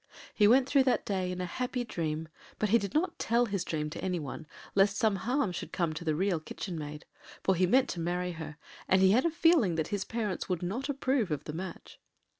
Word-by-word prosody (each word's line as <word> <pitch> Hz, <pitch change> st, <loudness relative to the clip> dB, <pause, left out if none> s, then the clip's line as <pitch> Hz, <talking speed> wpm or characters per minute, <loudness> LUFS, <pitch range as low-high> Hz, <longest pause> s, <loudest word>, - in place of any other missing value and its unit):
He 210 Hz, -, +5 dB
went 255 Hz, +4 st, +5 dB
through 275 Hz, -1 st, +4 dB
that 255 Hz, -, +2 dB
day 185 Hz, -2 st, -1 dB
in 180 Hz, -, -4 dB
a -, -, -1 dB
happy 250 Hz, +6 st, -2 dB
dream; 160 Hz, -7 st, -3 dB, 0.3 s
but 215 Hz, -, 0 dB
he 230 Hz, +3 st, +5 dB
did 200 Hz, -2 st, -5 dB
not 340 Hz, +5 st, 0 dB
tell 235 Hz, +1 st, +2 dB
his 200 Hz, -5 st, -2 dB
dream 150 Hz, -2 st, -2 dB
to -, -, -6 dB
any 180 Hz, -2 st, 0 dB
one, 150 Hz, +1 st, -7 dB, 0.3 s
lest 195 Hz, +1 st, +3 dB
some 215 Hz, -1 st, +2 dB
harm 245 Hz, 0 st, 0 dB
should 175 Hz, -, -6 dB
come 170 Hz, -4 st, 0 dB
to 155 Hz, -, -6 dB
the 155 Hz, -2 st, 0 dB
Real 185 Hz, 0 st, +1 dB
Kitchen 175 Hz, +3 st, -6 dB
Maid. 150 Hz, -1 st, -6 dB, 0.4 s
For 190 Hz, -, +3 dB
he 185 Hz, 0 st, +2 dB
meant 260 Hz, +7 st, +4 dB
to 175 Hz, -, -4 dB
marry 180 Hz, +2 st, -1 dB
her, 160 Hz, -2 st, -7 dB, 0.3 s
and 190 Hz, -, +4 dB
he 190 Hz, -, +6 dB
had 250 Hz, +8 st, +4 dB
a -, -, +4 dB
feeling 325 Hz, -, +3 dB
that 160 Hz, -1 st, -1 dB
his 200 Hz, -2 st, -1 dB
parents 215 Hz, -6 st, -3 dB
would 180 Hz, -2 st, -1 dB
not 235 Hz, +11 st, -3 dB
approve 265 Hz, -6 st, 0 dB
of 150 Hz, -3 st, -2 dB
the 150 Hz, -, -6 dB
match. 180 Hz, +3 st, -7 dB
190 Hz, 235 wpm, -30 LUFS, 170-235 Hz, 0.4 s, he